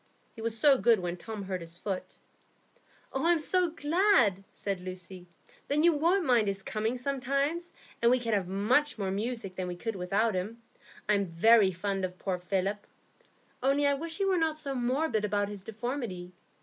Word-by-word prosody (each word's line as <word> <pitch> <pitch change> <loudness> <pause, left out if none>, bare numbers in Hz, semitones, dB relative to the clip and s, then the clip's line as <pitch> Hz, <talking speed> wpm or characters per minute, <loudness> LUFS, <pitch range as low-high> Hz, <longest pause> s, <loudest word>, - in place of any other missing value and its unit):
He 225 - -9
was 230 0 -1
so 275 +2 +5
good 230 -3 +4
when 175 -1 -3
Tom 210 +3 -7
hurt 185 -2 -4
his 165 0 -9
foot." 190 0 -5 1.0
"Oh, 270 - -1
I'm 345 0 +5
so 355 +3 +1
glad!" 310 - +3
said 195 -3 -4
Lucy. 185 0 -8 0.4
"Then 295 +2 +2
you 340 0 +6
won't 340 +5 +2
mind 240 -6 +3
his 195 -1 -2
coming 220 +3 -2
sometimes, 275 +6 -1 0.3
and 235 - +5
we 250 - +5
can 230 -2 -2
have 195 -3 +1
much 230 +10 +1
more 195 -3 -2
music 210 -1 -3
than 185 -1 -3
we 180 - -4
could 225 +4 -4
without 200 +5 +1
him. 200 +6 -3 0.5
I'm 200 -2 +2
very 195 +4 +5
fond 195 +2 -2
of 180 0 -3
poor 185 -2 -2
Philip, 195 +3 -2 0.7
only 275 +3 +2
I 285 - +4
wish 325 +4 -4
he 395 - +1
were 380 -2 +2
not 320 -1 0
so 285 -3 -4
morbid 250 -2 0
about 205 -1 0
his 205 -2 -7
deformity. 220 -4 -5
220 Hz, 185 wpm, -30 LUFS, 190-280 Hz, 1.0 s, you